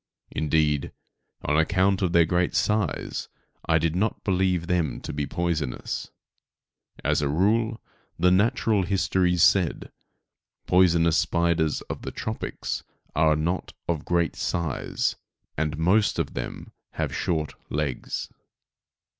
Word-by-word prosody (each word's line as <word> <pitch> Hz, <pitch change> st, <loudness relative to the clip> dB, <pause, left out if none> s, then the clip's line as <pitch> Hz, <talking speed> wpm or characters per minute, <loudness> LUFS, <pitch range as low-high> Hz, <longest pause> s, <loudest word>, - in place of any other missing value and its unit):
Indeed 75 Hz, -2 st, +1 dB, 0.5 s
on 75 Hz, +1 st, +2 dB
account 95 Hz, +4 st, +2 dB
of 90 Hz, -3 st, +1 dB
their 85 Hz, -1 st, +5 dB
great 90 Hz, +1 st, 0 dB
size 105 Hz, -6 st, 0 dB, 0.4 s
I 80 Hz, -, +4 dB
did 80 Hz, +1 st, 0 dB
not 105 Hz, +4 st, -1 dB
believe 95 Hz, -3 st, +1 dB
them 85 Hz, -8 st, 0 dB
to -, -, -6 dB
be 70 Hz, 0 st, -2 dB
poisonous. 85 Hz, -7 st, -2 dB, 0.9 s
As -, -, +2 dB
a 70 Hz, -, 0 dB
rule, 110 Hz, +8 st, +1 dB, 0.4 s
the 90 Hz, +2 st, +4 dB
natural 110 Hz, +1 st, +3 dB
histories 90 Hz, -2 st, +2 dB
said, 90 Hz, -5 st, +3 dB, 0.7 s
poisonous 85 Hz, -2 st, +4 dB
spiders 85 Hz, -3 st, +1 dB
of -, -, -7 dB
the -, -, -5 dB
tropics -, -, -4 dB, 0.3 s
are 80 Hz, 0 st, +4 dB
not 85 Hz, +4 st, -2 dB
of 80 Hz, -4 st, -1 dB
great 85 Hz, -1 st, +1 dB
size, 85 Hz, -5 st, -1 dB, 0.4 s
and 75 Hz, 0 st, -1 dB
most 95 Hz, +6 st, +3 dB
of -, -, -2 dB
them -, -, -6 dB, 0.2 s
have -, -, -2 dB
short 80 Hz, -3 st, -1 dB, 0.2 s
legs. 75 Hz, -3 st, -3 dB
85 Hz, 120 wpm, -25 LUFS, 80-95 Hz, 0.9 s, their